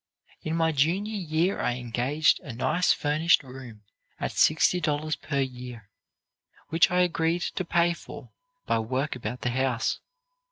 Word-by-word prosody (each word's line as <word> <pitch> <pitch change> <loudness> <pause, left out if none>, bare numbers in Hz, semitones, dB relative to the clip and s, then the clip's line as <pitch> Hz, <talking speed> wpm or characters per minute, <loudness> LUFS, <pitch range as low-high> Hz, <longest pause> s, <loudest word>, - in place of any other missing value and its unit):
"In 155 +1 -3
my 165 -1 +2
junior 175 +9 0
year 175 0 0
I 120 - 0
engaged 125 +5 +1
a 135 - -9
nice 160 +9 +1
furnished 155 +2 +2
room 125 -5 -11 0.4
at - - -2
$60 155 -1 +2
per 140 -2 -1
year, 125 -5 -7 0.8
which 165 +1 +4
I 180 0 +2
agreed 170 0 +1
to 185 - -2
pay 170 0 +2
for - - -11 0.3
by - - +1
work 130 +6 -2
about 125 0 -5
the 125 - -1
house. 130 -2 0
150 Hz, 145 wpm, -27 LUFS, 125-170 Hz, 0.8 s, which